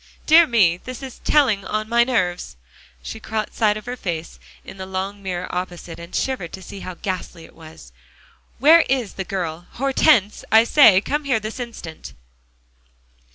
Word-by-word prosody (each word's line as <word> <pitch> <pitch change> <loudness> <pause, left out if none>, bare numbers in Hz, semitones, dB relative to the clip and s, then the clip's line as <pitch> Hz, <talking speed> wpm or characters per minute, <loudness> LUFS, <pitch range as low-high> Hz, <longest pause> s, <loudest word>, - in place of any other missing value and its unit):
Dear 325 +1 +7
me! 195 - +3
this 255 +7 -9
is 260 -2 -9
telling 245 -10 +3
on 215 +2 -3
my 235 +1 +4
nerves." 185 - -2 0.5
She 65 - -7
caught 220 -1 -4
sight 210 -2 +1
of 215 - -10
her 245 +1 -4
face 165 - -5 0.3
in - - -11
the 190 0 -7
long 190 +2 -4
mirror 180 -2 -4
opposite, 175 -2 -5
and 170 +1 -9
shivered 255 -11 -2
to 190 - -8
see 200 - -9
how 185 -1 -7
ghastly 180 -3 -5
it - - -18
was. 155 - -14 0.7
"Where 315 +6 +7
is 250 -6 -1
the 190 - -4
girl? 175 -3 -5
Hortense, 260 -5 +2
I 220 +1 +7
say, 230 -7 +6
come 295 +6 -2
here 260 -5 +1
this 215 +4 -7
instant!" 225 -10 -8
205 Hz, 170 wpm, -21 LUFS, 180-245 Hz, 0.7 s, Dear